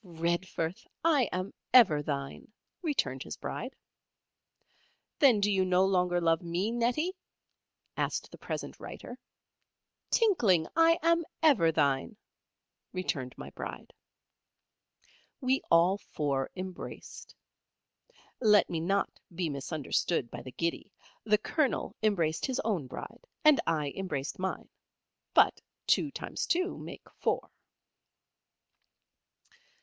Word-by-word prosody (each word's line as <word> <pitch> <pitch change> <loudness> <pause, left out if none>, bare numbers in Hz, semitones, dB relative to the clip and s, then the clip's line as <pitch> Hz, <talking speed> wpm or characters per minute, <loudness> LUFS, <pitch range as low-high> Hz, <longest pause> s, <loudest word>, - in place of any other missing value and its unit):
"Redforth! 170 0 -2 0.2
I 295 -7 +4
am 185 +2 -3 0.2
ever 175 -12 +7
thine," 140 +4 -5 0.3
returned 310 -6 -1
his - - -6
Bride. - - -5 1.4
"Then 265 -8 +6
do 205 +1 +2
you 190 -1 +3
no 185 0 +3
longer 180 -2 +2
love 165 0 +2
me, 175 +5 -1
Nettie?" 250 +10 0 0.8
asked - - -2
the - - -11
present - - -5
writer. - - -9 0.9
"Tinkling! 225 - +3
I 330 0 +5
am 335 0 +4 0.2
ever 215 - +5
thine," 140 - +1 0.7
returned 145 -9 -3
my - - -8
Bride. - - -8 1.5
We 260 0 +1
all 175 +4 +5
four 140 -7 -2
embraced. 185 -1 -8 1.0
Let 210 -4 +5
me 165 - -1
not 195 +5 0 0.2
be 170 -2 -1
misunderstood 140 -1 -1
by - - -6
the 130 - -9
giddy. 170 +7 -3 0.3
The 210 -1 +4
Colonel 275 +6 -1
embraced 175 - +1
his 260 - -2
own 190 - -1
Bride, - - -9 0.2
and 305 -2 +7
I 150 -4 0
embraced 150 -8 -4
mine. 190 0 -3 0.7
But - - +5 0.2
two 300 - +3
times - - -4
two 365 +2 +1
make - - -9
four. - - -1
185 Hz, 115 wpm, -30 LUFS, 165-240 Hz, 1.5 s, ever